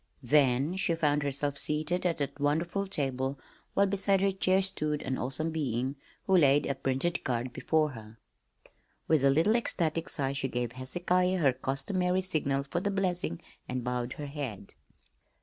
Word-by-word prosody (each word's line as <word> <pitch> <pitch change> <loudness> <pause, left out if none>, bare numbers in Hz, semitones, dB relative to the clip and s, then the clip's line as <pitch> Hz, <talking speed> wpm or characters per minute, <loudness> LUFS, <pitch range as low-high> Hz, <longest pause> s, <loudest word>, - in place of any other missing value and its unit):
Then 140 +4 +3
she 170 -3 +1
found 150 -2 +1
herself 140 0 -1
seated 155 +4 0
at 170 - -1
that 145 0 -3
wonderful 170 +7 0
table, 135 -5 -2 0.4
while 200 - +5
beside 195 0 +2
her 195 0 +3
chair 190 0 +2
stood 155 -6 -1
an 130 - -2
awesome 155 +6 -2
being 135 -3 -2 0.3
who 190 - +3
laid 145 -4 +5
a 140 - 0
printed 135 +5 -1
card 120 0 -2
before 155 -2 +1
her. 110 -2 -11 0.9
With 155 -4 +3
a 140 - +6
little 165 +11 +3
ecstatic 165 -8 0
sigh 135 -1 -1
she 140 -1 -1
gave 125 -2 -2
Hezekiah 180 +8 0
her 140 -7 +3
customary 180 +9 -1
signal 140 -6 0
for 140 +5 -2
the 200 - -1
blessing 180 - -1 0.3
and 125 -1 -2
bowed 125 0 -2
her 150 - -6
head. 140 -9 -6
145 Hz, 165 wpm, -30 LUFS, 135-180 Hz, 0.9 s, a